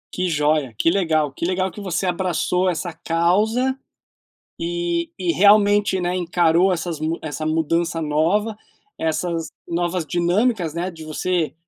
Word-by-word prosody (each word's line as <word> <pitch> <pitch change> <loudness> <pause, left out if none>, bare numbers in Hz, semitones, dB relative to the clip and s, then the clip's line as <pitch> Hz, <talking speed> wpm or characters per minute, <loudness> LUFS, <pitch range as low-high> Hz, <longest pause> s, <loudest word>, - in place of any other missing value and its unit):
Que 185 0 0
joia, 150 -5 +1
que 165 - +3
legal. 160 -6 +1
Que 135 - -9
legal 185 +2 0
que 205 - -9
você 185 -1 -2
abraçou 180 0 0
essa 175 0 -3
causa 210 +12 +1 0.8
e 170 0 -2
e 180 -2 0
realmente, 205 0 +4
né, 175 +1 -1
encarou 175 +1 +3
essas 170 -2 -3
mu 160 +2 -2
essa 155 0 -5
mudança 165 +1 0
nova. 165 +9 +1 0.4
Essas 165 0 -2 0.2
novas 175 0 -1
dinâmicas, 175 +1 +1
né, 175 +3 -3
de 160 -3 -11
você, 165 +1 -1
175 Hz, 140 wpm, -21 LUFS, 160-185 Hz, 0.8 s, realmente